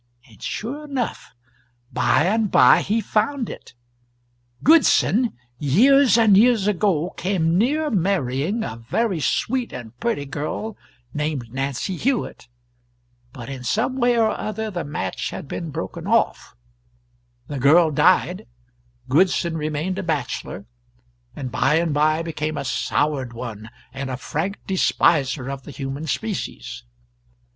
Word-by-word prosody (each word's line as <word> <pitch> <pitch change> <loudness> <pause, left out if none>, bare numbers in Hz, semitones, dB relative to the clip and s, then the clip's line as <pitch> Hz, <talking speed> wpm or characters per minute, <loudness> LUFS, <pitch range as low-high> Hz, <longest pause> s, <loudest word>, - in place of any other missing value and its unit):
And 110 -4 -19
sure 280 +8 -4
enough, 260 - -4 0.6
by - - +3
and 215 +2 +1
by 125 -7 +6
he 220 +3 0
found 230 +4 -1
it. - - -12 0.9
Goodson, 260 -6 +4 0.3
years 245 - +5
and 220 -4 +5
years 225 -1 +4
ago, 190 -5 +1
came 175 -3 0
near 295 - +1
marrying 185 - 0
a 115 -2 -5
very 175 - -1
sweet 240 - 0
and 120 -2 -9
pretty 185 -12 -1
girl, 150 +10 -4 0.4
named 150 -6 -3
Nancy 135 +7 -2
Hewitt, 255 - -2 0.8
but 120 -2 -9
in 135 -2 -7
some 220 - 0
way 240 -1 +3
or 225 -1 +3
other 215 0 -4
the 175 -3 -3
match 150 +1 -3
had 170 - -7
been 165 +3 -5
broken 165 +3 -6
off; 230 +1 0 0.9
the 145 -2 -4
girl 155 +5 +5
died, 185 +5 +2 0.6
Goodson 170 +3 +2
remained 155 +4 -2
a - - -3
bachelor, 140 - -3 0.7
and 130 -4 -5
by 145 +5 +2
and 165 -1 +1
by 155 +2 +2
became 155 -2 -3
a - - -3
soured 135 -1 -1
one 115 -2 -7 0.2
and 135 0 -5
a 130 - -3
frank 170 +9 -3
despiser 145 -7 +2
of 135 -1 -5
the 135 - -12
human 140 +3 -5
species. 150 - -4
165 Hz, 135 wpm, -22 LUFS, 140-220 Hz, 0.9 s, by